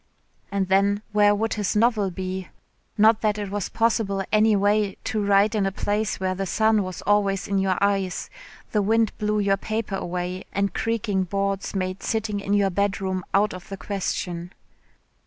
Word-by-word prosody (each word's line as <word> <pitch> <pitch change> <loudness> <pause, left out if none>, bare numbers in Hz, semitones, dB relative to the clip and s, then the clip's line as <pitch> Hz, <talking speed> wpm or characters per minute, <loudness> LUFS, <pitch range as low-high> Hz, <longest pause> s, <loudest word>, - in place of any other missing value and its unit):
And 195 -1 0
then 200 +2 +2
where 205 0 +4
would 225 +2 -1
his 210 -2 -1
novel 215 -2 +3
be? 185 0 -5 0.5
Not 215 +1 +5
that 215 -1 +1
it 205 -2 -4
was 205 -2 -2
possible 220 -4 +1
any 215 0 +4
way 205 0 +1
to 215 -1 -1
write 200 +2 +4
in 205 -3 +1
a - - -1
place 210 +2 -1
where 185 0 0
the 195 +1 -3
sun 220 +2 +3
was 185 -2 -6
always 200 -2 +1
in 200 -1 +1
your 190 -1 +1
eyes, 195 -2 0 0.4
the 210 - +2
wind 220 +2 +2
blew 210 0 0
your 195 -1 +2
paper 220 0 -3
away 180 +1 -4
and 200 -1 0
creaking 210 -4 -1
boards 195 +1 -2
made 185 0 -2
sitting 220 -2 -1
in 200 0 0
your 200 -1 +2
bedroom 190 -1 -1
out 205 +2 +2
of 185 -1 -10
the 195 - -6
question. 180 -3 -4
200 Hz, 175 wpm, -24 LUFS, 190-210 Hz, 0.5 s, Not